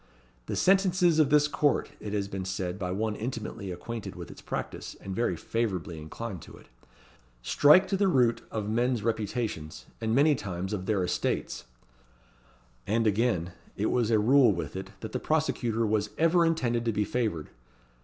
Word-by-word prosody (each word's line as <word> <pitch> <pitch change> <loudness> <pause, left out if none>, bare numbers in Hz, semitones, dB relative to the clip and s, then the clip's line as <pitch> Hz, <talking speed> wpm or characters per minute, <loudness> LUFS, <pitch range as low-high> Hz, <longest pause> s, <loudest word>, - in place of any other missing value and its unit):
"The - - -2
sentences 180 -3 +3
of 150 -3 +4
this 150 0 +5
court," 145 -1 +1
it 105 - -6
has 100 -1 -1
been 95 -1 -5
said 95 0 -3
by 90 -2 -3
one 105 +3 -1
intimately 110 -4 -5
acquainted 110 +5 -6
with - - -8
its - - -12
practice, - - -5
and 95 -1 -6
very 120 - 0
favourably 90 -8 -3
inclined 95 +4 -6
to - - -13
it, - - -18 0.7
"strike 150 - +6
to 195 - +1
the 200 0 +3
root 125 -9 +3
of 105 -2 -3
men's 120 +1 0
reputations, 110 -7 -3 0.2
and 110 0 0
many 150 +3 +5
times 95 -5 -4
of 95 -2 -4
their 100 -4 +1
estates;" 90 - -2 1.2
and, 115 +3 +1
again, 105 -5 +1 0.3
it 105 - 0
was 120 -3 +1
a 110 - +4
rule 125 +3 +5
with 85 -1 -4
it, 95 0 -5
that 110 - -6
the - - -2
prosecutor 120 -7 0
"was 105 -1 0
ever 165 +1 +4
intended 120 -8 0
to 115 - +2
be 105 -1 0
favoured." 105 -12 -2
110 Hz, 175 wpm, -28 LUFS, 100-130 Hz, 1.2 s, strike